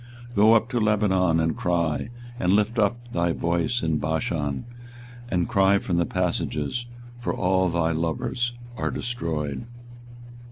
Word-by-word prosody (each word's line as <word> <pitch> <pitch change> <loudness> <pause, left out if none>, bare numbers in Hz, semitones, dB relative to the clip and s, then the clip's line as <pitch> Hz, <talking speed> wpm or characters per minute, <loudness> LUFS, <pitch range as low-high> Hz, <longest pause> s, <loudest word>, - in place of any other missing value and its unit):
24:022:020 120 - -14
Go 110 +2 +7
up 115 +1 +2
to 120 -1 0
Lebanon, 95 -6 +2
and 80 0 +1
cry; 85 +1 0 0.3
and 90 +1 +2
lift 105 +3 +2
up 120 +3 0
thy 85 0 +1
voice 85 +8 0
in 80 -2 +1
Bashan, 75 - -1 0.6
and 90 -2 +1
cry 100 0 +4
from 90 -3 -1
the 85 -2 +2
passages: 90 - -1 0.3
for 120 - -2
all 95 0 +2
thy 85 -1 +1
lovers 85 +9 -1 0.2
are - - -1
destroyed. 80 - -3
90 Hz, 145 wpm, -25 LUFS, 80-110 Hz, 0.6 s, Go